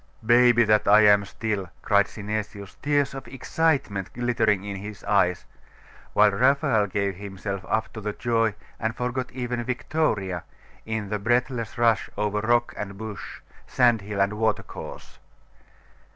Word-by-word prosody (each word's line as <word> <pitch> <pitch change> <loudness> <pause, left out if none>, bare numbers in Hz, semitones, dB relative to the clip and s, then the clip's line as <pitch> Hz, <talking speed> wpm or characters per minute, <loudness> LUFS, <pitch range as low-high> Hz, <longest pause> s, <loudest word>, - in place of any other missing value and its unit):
'Baby 120 0 +6
that 105 -1 +3
I 105 +1 +7
am 105 -1 +5
still!' 100 -3 -3
cried 100 -1 +3
Synesius, 105 -1 -5
tears 145 -1 +1
of 135 - -8
excitement 130 - -1
glittering 120 -5 +1
in 100 -1 -5
his 105 +1 -8
eyes;.... 90 -4 +1 0.7
while 105 - +5
Raphael 130 -1 +2
gave 100 0 -1
himself 100 -1 -5
up 110 - -1
to 110 - -7
the 105 0 -2
joy, 115 -2 0 0.2
and 110 0 -2
forgot 125 +1 -3
even 125 -1 -3
Victoria, 110 - -1 0.4
in 110 -2 -3
the 105 0 -2
breathless 120 +1 0
rush 115 -3 +2
over 105 0 0
rock 120 +2 +2
and 100 -1 -6
bush, 110 -1 -8 0.3
sandhill 110 -5 +2
and 100 +2 +2
watercourse. 110 +1 -4
110 Hz, 135 wpm, -25 LUFS, 100-120 Hz, 0.7 s, I